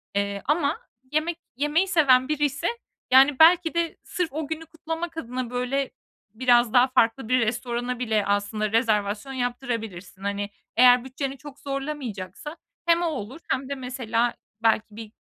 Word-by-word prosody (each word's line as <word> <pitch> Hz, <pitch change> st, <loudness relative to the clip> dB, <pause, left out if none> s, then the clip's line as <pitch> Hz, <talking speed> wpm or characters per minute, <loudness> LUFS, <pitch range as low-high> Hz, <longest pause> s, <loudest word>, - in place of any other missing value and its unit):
Eee, 200 Hz, 0 st, -1 dB
ama 295 Hz, +1 st, +1 dB, 0.3 s
yemek 320 Hz, +2 st, 0 dB, 0.2 s
yemeyi 295 Hz, +8 st, +1 dB
seven 265 Hz, -8 st, +4 dB
biriyse, 295 Hz, +1 st, 0 dB, 0.4 s
yani, 270 Hz, +1 st, +6 dB
belki 335 Hz, +1 st, +6 dB
de 335 Hz, -1 st, -1 dB
sırf 360 Hz, -3 st, -2 dB
o 310 Hz, 0 st, -3 dB
günü 320 Hz, +1 st, -5 dB
kutlamak 325 Hz, +1 st, -6 dB
adına, 250 Hz, -4 st, -4 dB
böyle, 250 Hz, +2 st, -1 dB, 0.4 s
biraz 240 Hz, -1 st, +3 dB
daha 250 Hz, +1 st, +6 dB
farklı 230 Hz, -2 st, +1 dB
bir 255 Hz, 0 st, +4 dB
restorana 240 Hz, +2 st, -2 dB
bile 220 Hz, -4 st, 0 dB
aslında 205 Hz, +1 st, 0 dB
rezervasyon 220 Hz, +1 st, 0 dB
yaptırabilirsin. 230 Hz, -7 st, -4 dB
Hani, 200 Hz, 0 st, -2 dB, 0.3 s
eğer 250 Hz, 0 st, +7 dB
bütçeni 270 Hz, +1 st, -4 dB
çok 285 Hz, +1 st, -12 dB
zorlamayacaksa 275 Hz, -, -5 dB, 0.3 s
hem 340 Hz, 0 st, +4 dB
o -, -, +1 dB
olur 265 Hz, -2 st, -5 dB
hem 265 Hz, +1 st, -1 dB
de 280 Hz, -, -2 dB
mesela 245 Hz, -2 st, -1 dB, 0.3 s
belki 220 Hz, -1 st, +3 dB
bir, 220 Hz, -1 st, -9 dB
255 Hz, 145 wpm, -25 LUFS, 225-295 Hz, 0.4 s, eğer